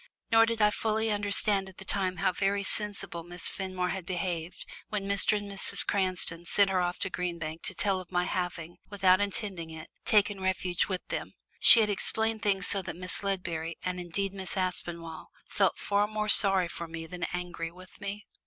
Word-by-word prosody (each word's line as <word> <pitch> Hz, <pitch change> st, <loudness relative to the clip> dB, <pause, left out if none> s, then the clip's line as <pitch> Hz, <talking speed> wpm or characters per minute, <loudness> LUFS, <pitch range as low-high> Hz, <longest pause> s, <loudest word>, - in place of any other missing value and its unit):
Nor 225 Hz, 0 st, +6 dB
did 230 Hz, -1 st, 0 dB
I 210 Hz, -, +5 dB
fully 220 Hz, 0 st, 0 dB
understand 205 Hz, -1 st, 0 dB
at 190 Hz, -, -17 dB
the 190 Hz, -, -10 dB
time 185 Hz, -2 st, -1 dB
how 175 Hz, -, +2 dB
very 200 Hz, +2 st, 0 dB
sensibly 200 Hz, -4 st, -3 dB
Miss 175 Hz, 0 st, +3 dB
Fenmore 185 Hz, -2 st, -3 dB
had 190 Hz, -1 st, -3 dB
behaved 175 Hz, -2 st, -4 dB, 0.2 s
when 205 Hz, -2 st, -3 dB
Mr. 200 Hz, +1 st, +3 dB
and 205 Hz, 0 st, -6 dB
Mrs. 195 Hz, -1 st, -3 dB
Cranston 185 Hz, -3 st, 0 dB
sent 195 Hz, +3 st, +2 dB
her 185 Hz, -1 st, +2 dB
off 175 Hz, 0 st, -1 dB
to 190 Hz, -, -1 dB
Green 180 Hz, -2 st, -3 dB
Bank 160 Hz, 0 st, -6 dB
to 190 Hz, -, 0 dB
tell 195 Hz, 0 st, +1 dB
of 185 Hz, -1 st, -11 dB
my 180 Hz, -1 st, +1 dB
having, 175 Hz, -2 st, -4 dB
without 190 Hz, -2 st, +3 dB
intending 200 Hz, -5 st, -2 dB
it, 160 Hz, -1 st, -10 dB
taken 205 Hz, -2 st, +3 dB
refuge 185 Hz, -1 st, 0 dB
with 185 Hz, -2 st, -4 dB
them; -, -, -5 dB, 0.2 s
she 230 Hz, -, +10 dB
had 210 Hz, -, +2 dB
explained 220 Hz, +2 st, +1 dB
things 195 Hz, -2 st, +1 dB
so 200 Hz, -, +3 dB
that 175 Hz, -3 st, -6 dB
Miss 185 Hz, +1 st, -5 dB
Ledbury, 170 Hz, -4 st, -3 dB
and 180 Hz, 0 st, -3 dB
indeed 190 Hz, +3 st, -3 dB
Miss 190 Hz, 0 st, -6 dB
Aspinall, 175 Hz, -3 st, -2 dB, 0.2 s
felt -, -, +1 dB
far 205 Hz, 0 st, +1 dB
more 215 Hz, 0 st, -3 dB
sorry 195 Hz, -3 st, +5 dB
for 170 Hz, 0 st, -7 dB
me 165 Hz, 0 st, -7 dB
than 180 Hz, +1 st, -5 dB
angry 175 Hz, -2 st, -4 dB
with 185 Hz, +1 st, -16 dB
me. 205 Hz, +1 st, -6 dB
190 Hz, 195 wpm, -29 LUFS, 175-205 Hz, 0.2 s, she